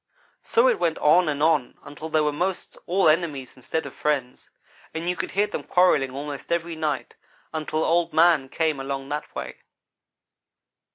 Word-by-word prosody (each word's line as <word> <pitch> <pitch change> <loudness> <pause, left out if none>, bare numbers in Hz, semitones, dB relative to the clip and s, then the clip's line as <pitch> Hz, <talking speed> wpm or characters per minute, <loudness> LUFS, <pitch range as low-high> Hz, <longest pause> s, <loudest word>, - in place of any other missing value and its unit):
So 465 +2 +3
it 485 -4 +2
went 160 - +1
on 160 +3 +4
and 145 0 -1
on 155 -6 +2
until 145 +3 -8
they 155 0 +2
were 150 0 +1
most 180 +5 -3
all 185 0 +3
enemies 155 -5 0
instead 150 +5 -3
of - - -8
friends, 140 -5 -2 0.5
and 165 +2 -3
you 180 - +1
could - - -3
hear 200 +2 +2
them 210 - -5
quarrelling 180 -7 +3
almost 140 +3 -7
every 170 0 -1
night, 155 -2 -3 0.4
until 155 0 -1
Old 170 0 +2
man 160 -5 +4
came 155 -1 0
along 135 0 -4
that 150 +1 -5
way. - - -6
155 Hz, 170 wpm, -24 LUFS, 145-170 Hz, 0.5 s, on